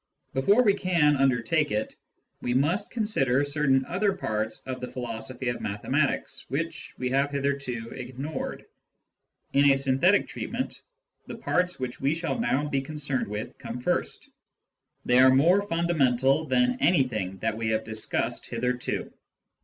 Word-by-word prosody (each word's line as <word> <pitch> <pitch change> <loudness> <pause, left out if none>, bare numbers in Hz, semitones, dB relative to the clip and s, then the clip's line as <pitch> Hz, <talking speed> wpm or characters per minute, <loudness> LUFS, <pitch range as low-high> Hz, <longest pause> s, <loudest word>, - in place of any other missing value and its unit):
Before 200 - +4
we 205 -4 +5
can 170 -7 +2
undertake 135 +3 +2
it, 105 +1 -2 0.5
we 120 - -1
must 150 +9 +1
consider 145 - +1
certain 140 -2 +2
other 195 +3 0
parts 110 - -3
of 130 -1 -5
the 125 - -4
philos 115 -3 -5
ophy 125 -1 -2
of - - -9
mathematics, 105 0 -1
which 165 +4 -4
we 125 0 -2
have 140 +2 +2
hitherto 140 -5 -2
ignored. 130 +4 -6 0.9
In 140 +1 +5
a 135 - +5
synthetic 135 +9 +3
treatment, - - -4 0.5
the - - -6
parts 180 0 0
which 130 -1 -5
we 140 +3 +2
shall 165 +8 -2
now 150 - +1
be 140 -2 0
concerned 145 -1 -3
with 105 +4 -6
come 120 -2 -6
first: 125 - -2 0.8
they 125 +1 +4
are 130 0 +8
more 165 +10 +5
fundamental 155 -6 +2
than 125 -2 +2
anything 125 - +1
that 110 +3 -1
we 110 0 -3
have 110 0 0
discussed 110 -1 -1
hitherto. 125 +1 -2
135 Hz, 145 wpm, -27 LUFS, 125-155 Hz, 0.9 s, are